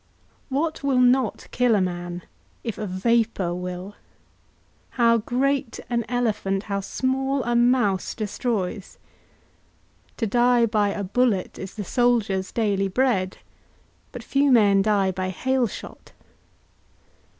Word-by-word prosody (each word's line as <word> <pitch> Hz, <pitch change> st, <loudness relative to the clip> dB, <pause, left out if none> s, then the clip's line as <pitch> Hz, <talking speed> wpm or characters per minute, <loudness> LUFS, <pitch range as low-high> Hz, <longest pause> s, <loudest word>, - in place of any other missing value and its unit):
What 305 Hz, +4 st, -1 dB
will 275 Hz, -2 st, +1 dB
not 250 Hz, -2 st, +2 dB
kill 245 Hz, -3 st, +3 dB
a -, -, +3 dB
man 175 Hz, -1 st, -3 dB, 0.4 s
if 230 Hz, -2 st, -4 dB
a 215 Hz, -, -3 dB
vapour 200 Hz, -1 st, 0 dB
will? 180 Hz, +2 st, -6 dB, 1.0 s
How 230 Hz, -1 st, +4 dB
great 265 Hz, +3 st, -1 dB
an 235 Hz, -2 st, 0 dB
elephant, 210 Hz, -5 st, -1 dB
how 200 Hz, -2 st, -2 dB
small 265 Hz, +5 st, -1 dB
a 240 Hz, 0 st, -1 dB
mouse 240 Hz, -5 st, +2 dB
destroys! 210 Hz, -2 st, -3 dB, 1.2 s
To 230 Hz, -, -1 dB
die 240 Hz, +2 st, +3 dB
by 210 Hz, -2 st, +1 dB
a 200 Hz, 0 st, -3 dB
bullet 205 Hz, -1 st, 0 dB
is 190 Hz, 0 st, -7 dB
the 210 Hz, -, -4 dB
soldier's 205 Hz, -4 st, +1 dB
daily 200 Hz, -4 st, 0 dB
bread; 195 Hz, -3 st, 0 dB, 0.7 s
but -, -, -8 dB
few 275 Hz, 0 st, +2 dB
men 205 Hz, -5 st, +5 dB
die 200 Hz, -2 st, +2 dB
by 185 Hz, 0 st, -3 dB
hail 260 Hz, +6 st, 0 dB
shot. -, -, -10 dB
220 Hz, 125 wpm, -24 LUFS, 195-245 Hz, 1.2 s, men